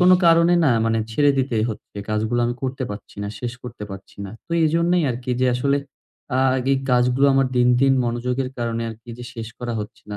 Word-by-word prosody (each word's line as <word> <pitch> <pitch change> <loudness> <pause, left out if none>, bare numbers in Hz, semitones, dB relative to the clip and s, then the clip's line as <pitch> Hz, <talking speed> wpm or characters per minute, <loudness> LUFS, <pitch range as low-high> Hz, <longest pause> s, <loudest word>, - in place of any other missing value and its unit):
কোনো 180 +1 +7
কারণে 170 +1 +5
না 135 - +4
মানে 115 0 +1
ছেড়ে 145 +5 +4
দিতে 130 -3 0
হচ্ছে। 110 -2 -8
কাজগুলো 110 +3 0
আমি 120 - -1
করতে 130 0 -3
পারছি 100 0 -9
না। 100 - -3
শেষ 120 -1 -3
করতে 120 -4 -7
পারছি 95 0 -10
না। 100 - -7 0.2
তো - - -41
এইজন্যেই 170 +2 +2
আরকি 125 +1 -4
যে 130 - +3
আসলে 140 +3 +1 0.6
আ - - +2 0.2
আগে 130 +1 -1
এই 135 - 0
কাজগুলো 125 +2 +3
আমার 135 0 +3
দিন, 125 0 +4
দিন 135 0 +5
মনোযোগের 125 +2 -1
কারণে 115 -1 -2
আরকি 110 +2 -12
যে 120 - -7
শেষ 115 -1 -6
করা 120 -1 -4
হচ্ছে 105 +4 -9
না। 105 - -4
125 Hz, 215 wpm, -22 LUFS, 115-135 Hz, 0.6 s, কোনো